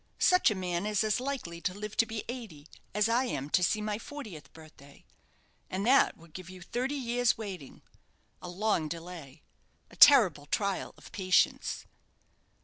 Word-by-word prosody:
Such 365 0 +4
a 215 - -1
man 180 +1 -2
is 210 0 +1
as 215 +2 +1
likely 250 -11 -5
to 185 - -2
live 210 +1 -7
to 230 - +4
be 220 -1 -5
eighty 220 - -8 0.2
as 210 +1 +1
I 240 +3 +2
am 145 - -4
to 180 - +3
see 210 +4 +1
my 210 0 -3
fortieth 215 - -9
birthday. 155 -3 -16 0.6
And 190 +2 -3
that 270 +3 +4
would 165 -1 -18
give 185 -2 -9
you 185 -1 -11
thirty 255 +9 -2
years' 245 -2 +1
waiting: 190 -10 -8 0.6
a 180 - -7
long 185 -3 0
delay 165 -3 -9 0.5
a - - -14
terrible 190 - +7
trial 200 +4 -2
of - - -15
patience." 185 -1 +1
200 Hz, 165 wpm, -30 LUFS, 170-230 Hz, 0.6 s, terrible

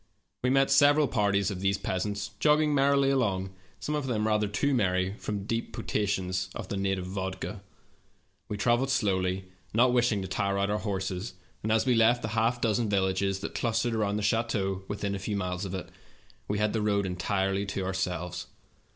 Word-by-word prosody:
We 125 - +1
met 135 +1 +3
several 145 +2 +6
parties 100 -3 +1
of 95 - -5
these 95 +1 +1
peasants 100 +3 -3
jogging 150 0 +4
merrily 140 0 +3
along, 95 -8 0 0.3
some 150 - -3
of 150 -3 -1
them 110 -4 0
rather 105 -1 +2
too 140 +8 0
merry 95 -5 +1
from 100 -2 -4
deep 115 +1 -3
potations 95 -5 -1
of 110 -5 -6
the - - -2
native 95 -1 -1
vodka. 95 +1 -4 0.9
We 105 - -4
traveled 120 +5 +2
slowly, 95 -6 0 0.2
not 125 +2 +5
wishing 120 -5 +2
to - - -4
tire 100 +2 -1
our 100 +2 0
horses, 95 0 -3 0.3
and, 110 - -1
as 110 +2 +3
we 125 - +3
left 115 +1 +4
the 110 - -2
half 115 +2 +1
dozen 115 -1 +1
villages 95 0 +1
that - - -5
clus 115 -1 0
tered 120 -1 -1
around 105 -2 0
the 105 - -2
chateau 100 -4 0
within 100 -1 -3
a 100 - -3
few 105 +2 -3
miles 90 +1 -2
of 95 0 -4
it, 95 - -6 0.6
we 105 - -1
had 105 0 +1
the 110 - 0
road 100 -1 +1
entirely 95 +2 -1
to 100 -1 -3
ourselves. 90 -2 -3
105 Hz, 185 wpm, -28 LUFS, 95-115 Hz, 0.9 s, several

